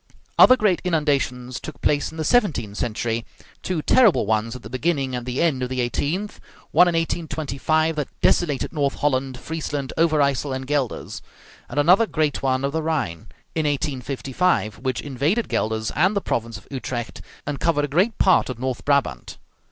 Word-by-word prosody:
Other 255 - +9
great 210 -7 +2
inundations 140 -7 0
took 145 -5 -9
place 145 -1 +1
in 160 - -11
the 160 - -2
seventeenth 145 - +1
century; 115 +1 -2 0.4
two 175 -5 -2
terrible 235 - +5
ones 110 +2 0
at 125 - -10
the - - -7
beginning 135 -1 -1
and 125 0 -5
the 125 +5 0
end 145 -6 +1
of 125 - -2
the 130 0 -3
eighteenth; 155 - -2 0.3
one 180 - +6
in 175 - +1
1825 160 -1 0
that 150 - -1
desolated 150 -6 +1
North 140 -3 0
Holland, 135 -2 0
Friesland, 145 -3 -4
Over 165 -2 +3
Yssel, 140 -1 +1
and 130 0 -5
Gueldres; 140 -3 -2 0.5
and 145 - -2
another 180 +9 +5
great 155 -5 0
one 130 0 +1
of 140 - -1
the 160 +2 -1
Rhine, 145 - -2 0.3
in 155 -2 0
1855, 135 - -1
which 130 +1 -2
invaded 145 - 0
Gueldres 110 0 -1
and 185 +8 +3
the - - +2
province 115 -7 -2
of 105 - -16
Utrecht, 125 -3 -5 0.2
and 145 -1 -3
covered 150 -3 +1
a - - -5
great 185 +11 +1
part 185 -7 +4
of 130 - -4
North 130 0 -3
Brabant. 140 - 0
140 Hz, 175 wpm, -23 LUFS, 125-160 Hz, 0.5 s, Other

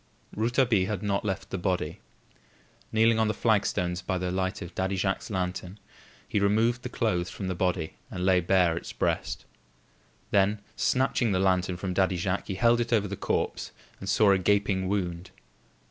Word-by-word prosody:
Rouletabille 115 -3 +2
had 105 -2 -3
not 100 -1 0
left 95 -1 -3
the 95 - -2
body. 90 -1 -1 0.9
Kneeling 110 0 +4
on 110 - +3
the 110 - -1
flagstones 90 -5 +1
by 90 +1 -2
the 90 0 -2
light 95 0 -2
of 85 - -9
Daddy 95 +1 -1
Jacques's 95 0 -1
lantern 90 -1 -3 0.5
he 105 - 0
removed 110 +4 +2
the 125 - -5
clothes 90 -7 0
from 95 - -5
the 95 - -1
body 90 -2 -1 0.2
and 90 0 -3
laid 90 -2 +3
bare 90 -3 +4
its - - -6
breast. - - -2 0.9
Then 100 +1 +3 0.2
snatching 125 -4 +1
the 90 - +1
lantern 90 -1 +1
from 90 0 -3
Daddy 95 -1 +2
Jacques, 95 +2 -2
he 95 - -3
held 120 +4 +3
it 120 - -3
over 105 -3 +2
the 100 - -4
corpse - - -2 0.3
and 95 - -5
saw 105 0 +5
a 95 - +4
gaping 100 0 +1
wound. 90 -3 -2
95 Hz, 175 wpm, -27 LUFS, 90-105 Hz, 0.9 s, saw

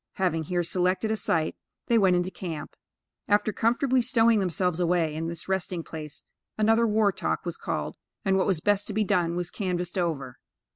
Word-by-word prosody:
Having 170 -4 0
here 175 +2 0
selected 185 +5 +1
a - - +2
site, 160 -6 0 0.3
they 235 -2 +3
went 190 -3 +4
into 180 +1 0
camp. 170 -6 -6 0.5
After 210 +1 +2
comfortably 250 +3 +2
stowing 230 -2 +4
themselves 180 -2 0
away 170 -3 +1
in 160 +1 -3
this 170 0 -6
resting 185 -2 -2
place, 155 -3 -8 0.3
another 225 +2 +4
"war 210 -1 +3
talk" - - -2
was - - -3
called, - - -4 0.3
and 190 -1 +3
what 190 - +2
was 185 -6 +1
best 205 +1 +1
to 210 - -3
be 215 - +2
done 180 -5 +1
was 175 0 -3
canvassed 180 -2 -2
over. 140 -7 -2
185 Hz, 185 wpm, -27 LUFS, 170-210 Hz, 0.5 s, went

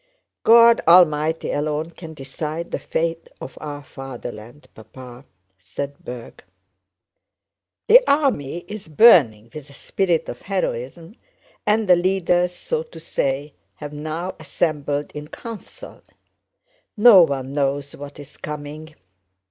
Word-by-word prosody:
"God 230 0 +6
Almighty 160 -2 +4
alone 150 +2 -2
can 160 -2 -11
decide 155 +4 -6
the - - -2
fate 165 0 -3
of 130 - -9
our 145 -1 -7
fatherland, 125 -1 -10
Papa," 125 +4 -13 0.3
said 140 +10 -7
Berg. 120 -1 -9 1.4
"The 485 +3 +8
army 175 - 0
is 210 -3 -8
burning 140 - +5
with 150 -2 -10
a - - -15
spirit 175 +3 -1
of 120 - -8
heroism 170 - -4 0.5
and 210 0 +2
the 180 - +7
leaders, 180 -1 +1
so 475 - -3
to 480 0 -12
say, 140 +2 -2 0.2
have 150 0 -8
now 155 +5 -5
assembled 150 -2 -2
in 150 0 -8
council. 230 - -10 1.0
No 210 -3 +8
one 135 -4 0
knows 140 0 -2
what 145 +1 -10
is 145 -1 -12
coming. 150 +1 -8
155 Hz, 120 wpm, -21 LUFS, 140-180 Hz, 1.4 s, The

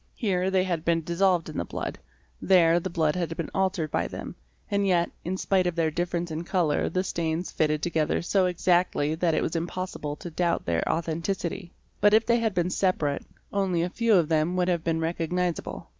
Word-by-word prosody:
Here 190 -5 0
they 190 -1 +2
had 170 -4 -2
been 165 -1 +1
dissolved 175 +1 +2
in 155 - -5
the - - 0
blood, - - -5 0.4
there 175 -3 +5
the - - -4
blood 160 -2 +1
had 170 -2 -2
been 165 - -4
altered 185 -5 0
by - - 0
them, - - -7 0.4
and 200 0 +1
yet 175 -2 +2
in 185 +2 -2
spite 185 -1 +1
of 175 - -1
their 165 -2 +1
difference 175 +1 -2
in 160 +2 -3
colour 170 -4 +1
the 185 +3 0
stains 170 -1 -2
fitted 150 -1 0
together 160 -2 0
so 185 +1 +2
exactly 175 -4 +1
that 165 0 +1
it - - +1
was 160 - -2
impossible 170 -3 -3
to 175 - -8
doubt 170 +1 0
their 85 -1 +1
authenticity; 170 +2 -3 0.3
but 210 +1 +5
if 220 +1 +4
they 235 0 +3
had 225 -3 -1
been 175 +1 +1
separate, 160 -8 0 0.3
only 190 -4 +1
a 175 - -1
very - - -26
few 230 -2 +3
of 170 -4 +4
them 160 +2 +1
would 180 0 +1
have 170 -2 0
been 165 -1 0
recognisable. 170 +1 -2
175 Hz, 205 wpm, -26 LUFS, 160-185 Hz, 0.4 s, there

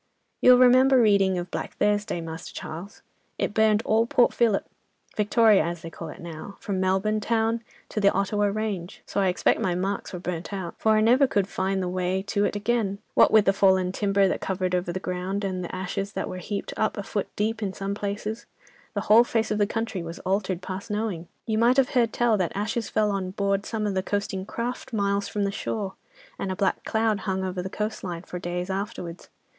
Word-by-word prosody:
"'You'll 250 0 +8
remember 255 +1 +6
reading 200 -4 +4
of 175 0 -4
Black - - -4
Thursday, 205 -3 0
Master 160 0 -7
Charles? 175 +6 -8 0.3
it - - -1
burned 220 0 +3
all 225 +1 +3
Port 250 -2 +3
Phillip, 225 -4 +2 0.5
Victoria 215 0 +4
as 170 -1 -4
they 165 - -7
call 165 0 -7
it - - -10
now, 170 +3 -8
from 195 -2 -3
Melbourne 190 +3 +1
town 225 +1 0 0.3
to - - -2
the 200 - +5
Ottawa 205 +1 +1
range. 200 -4 -3
So 200 - -1
I 195 - +3
expect 180 - +2
my 180 -2 +1
marks 195 +3 -2
were 180 - -5
burnt 175 0 -5
out. 190 -4 -4
For 220 - +3
I 215 - +4
never 250 +5 +5
could 200 -6 +1
find 190 0 -1
the - - -2
way 185 +1 -1
to 205 0 0
it - - -1
again: 205 -1 0 0.2
what - - +6
with 215 -2 +6
the 195 - +4
fallen 190 -2 +3
timber 195 0 +2
that - - -1
covered 185 -1 -1
over 180 -1 0
the 185 - -3
ground, 185 +2 -3
and 185 -2 -2
the 175 - -5
ashes 195 +2 -3
that - - -3
was 180 -1 -7
heaped 205 -1 -4
up 215 0 0
a 205 - -3
foot 205 0 -2
deep 220 +2 -1
in 200 -3 -1
some 195 +1 -4
places, 210 +2 -4 0.5
the 205 - 0
whole 220 +3 +6
face 225 -2 -1
of 210 - 0
the 205 - +3
country 225 -4 -3
was 170 +1 -7
altered 190 -2 -1
past 190 +4 -6
knowing. 210 -5 -2 0.2
You 220 -2 0
might 240 +3 +4
have 270 -2 +4
heard 235 -3 +2
tell 235 -2 +2
that 180 -3 -1
ashes 210 +2 -2
fell 215 -1 +1
on 195 -2 -2
board 200 +1 -1
some 220 -2 -2
of 205 - 0
the 190 - +1
coasting 195 -1 -3
craft 240 +2 -4
miles 200 -1 0
from 205 - -2
the 200 - 0
shore, 200 -1 -3 0.5
and 190 - -2
a - - -2
black 195 0 0
cloud 220 -2 +1
hung 190 -2 -2
over 185 -1 -2
the 190 - -5
coastline, 190 -5 -4
for 180 - -6
days 180 +1 -3
afterwards. 190 -3 -5
200 Hz, 215 wpm, -26 LUFS, 185-215 Hz, 0.5 s, You'll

